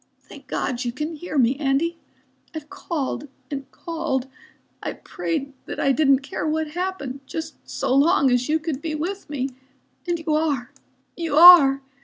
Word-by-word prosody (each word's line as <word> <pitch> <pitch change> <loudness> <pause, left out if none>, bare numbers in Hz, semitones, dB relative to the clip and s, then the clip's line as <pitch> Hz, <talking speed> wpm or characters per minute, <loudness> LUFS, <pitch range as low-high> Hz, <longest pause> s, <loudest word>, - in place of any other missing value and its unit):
"Thank - - -14
God 250 0 -2
you 240 - -2
can 300 +6 -4
hear 310 0 -5
me, 250 0 +4
Andy. 305 +4 0 0.6
I've 305 +1 -7
called 300 -7 -4 0.2
and 275 -2 -5
called. 315 -6 -3 0.6
I - - -3
prayed 280 -4 -4
that - - -5
I 275 - +3
didn't 275 -1 +4
care 280 - -4
what 310 0 -1
happened, 340 -6 -4
just 320 - -5 0.2
so - - -1
long 275 -1 +4
as 245 +2 +1
you 315 - +3
could 310 -3 -4
be 315 -1 -3
with 365 +5 -4
me. 275 -2 -2 0.6
And 345 -1 0
you 320 -1 -2
are, 290 -5 0 0.4
you 330 -4 -2
are. 295 -5 +9
300 Hz, 165 wpm, -23 LUFS, 270-330 Hz, 0.6 s, are